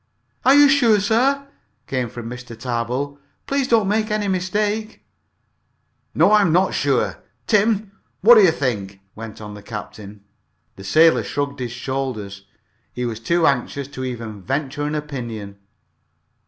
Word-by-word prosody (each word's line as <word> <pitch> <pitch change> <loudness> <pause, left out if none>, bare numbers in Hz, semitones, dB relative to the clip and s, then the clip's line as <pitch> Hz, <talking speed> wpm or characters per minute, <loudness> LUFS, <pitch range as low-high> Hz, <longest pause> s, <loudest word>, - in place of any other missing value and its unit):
"Are 265 +2 +6
you 290 0 +8
sure, 245 -6 +4
sir?" 260 +7 +1 0.4
came 130 -3 -2
from 115 0 -8
Mr. 120 -1 -9
Tarbill. 125 +4 -3 0.3
"Please 275 -2 0
don't 225 -5 +3
make 215 +2 0
any 210 -1 -1
mistake." 205 +4 -2 1.1
"No, - - +4
I 215 0 +6
am 185 -5 +2
not 185 +3 +2
sure. 130 -9 0 0.3
Tim, 210 -1 +2 0.3
what 230 +5 +8
do 220 - +8
you 190 - +6
think?" 105 -10 -2
went 110 -1 -9
on 105 -1 -8
the 105 - -10
captain. 105 -1 -9 0.5
The 95 - -11
sailor 160 +11 +4
shrugged 140 0 -3
his 125 -2 -4
shoulders. 120 -6 -5 0.4
He 125 - -4
was 115 -2 -4
too 170 +8 +1
anxious 140 0 0
to 130 -2 -7
even 115 -5 -6
venture 140 +5 -3
an 150 - -2
opinion. 120 -9 -6
140 Hz, 150 wpm, -21 LUFS, -, 1.1 s, you